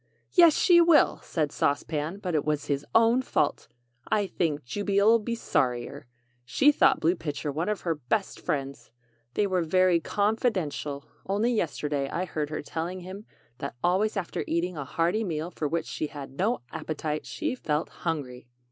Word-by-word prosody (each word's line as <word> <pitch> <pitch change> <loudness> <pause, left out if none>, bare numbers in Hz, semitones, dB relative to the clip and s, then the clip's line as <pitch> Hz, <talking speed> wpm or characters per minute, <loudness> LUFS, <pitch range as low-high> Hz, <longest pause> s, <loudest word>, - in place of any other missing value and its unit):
"Yes, 340 -4 +6
she 345 -1 +6
will!" 335 -2 +5
said 155 -4 -2
Sauce 145 - +1
Pan; 155 +4 -3
"but 185 -4 -4
it 150 - +1
was 150 -1 -1
his 140 0 -1
own 230 +3 +5
fault! 150 - 0 0.4
I 205 -1 +3
think 160 -5 -1
Jubey'll 205 - +3
be 230 +2 -3
sorrier! 130 - -1 0.4
She 125 - +4
thought 270 -2 +4
Blue 170 +3 +2
Pitcher 150 -3 -4
one 160 +7 -2
of 210 -3 -2
her 170 - 0
best 160 - -2
friends. 140 -4 -3 0.5
They 210 - +2
were 185 -2 +1
very 180 +1 +3
con 205 +5 0
fi 245 - +3
dent 180 -10 -3
ial. 140 -1 -5 0.2
Only 210 +5 +1
yesterday 150 -7 -1
I 180 - -2
heard 155 -4 -3
her 155 - -4
telling 170 +5 -4
him 190 +4 -9 0.3
that 140 -1 -5
always 200 +5 +2
after 185 -3 -3
eating 170 +2 -1
a 140 -3 -5
hearty 170 +10 0
meal 165 -2 -3
for 155 - -2
which 165 +2 -1
she 155 - -3
had 145 -3 -8
no 200 - 0
appetite, 155 -1 -4
she 310 -4 -2
felt 155 -11 -2
hungry." 135 -7 -4
170 Hz, 180 wpm, -27 LUFS, 150-205 Hz, 0.5 s, Yes